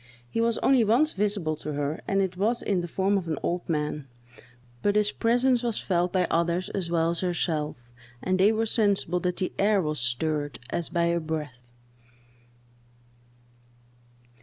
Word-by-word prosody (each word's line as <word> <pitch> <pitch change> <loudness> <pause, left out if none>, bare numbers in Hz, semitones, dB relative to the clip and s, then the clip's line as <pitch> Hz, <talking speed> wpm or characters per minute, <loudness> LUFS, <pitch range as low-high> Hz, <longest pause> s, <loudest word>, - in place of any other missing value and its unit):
He 230 - -1
was 230 0 +2
only 265 -3 +5
once 245 +9 +3
visible 200 -6 0
to 150 0 -5
her, 145 +1 -2
and 195 0 +2
it 185 -1 -3
was 220 +6 0
in 190 -3 +1
the 175 - -4
form 195 +3 +1
of 175 - -8
an 155 -3 -2
old 175 +1 -2
man; 150 -2 -2 0.7
but 205 0 +1
his 210 0 +2
presence 245 +2 +2
was 235 -3 -1
felt 180 -1 0
by 185 -1 +2
others 170 +2 +1
as 185 -4 -3
well 165 -1 +2
as 170 - 0
herself, 150 -8 -2 0.3
and 185 +7 0
they 200 +3 +6
were 225 +1 0
sensible 200 -6 +1
that 180 0 -2
the 185 - -2
air 205 0 +4
was 155 -4 -1
stirred, 145 +5 0
as 170 - -2
by 170 -1 0
a 170 0 +2
breath. 150 -7 -6
180 Hz, 170 wpm, -26 LUFS, 155-205 Hz, 0.7 s, they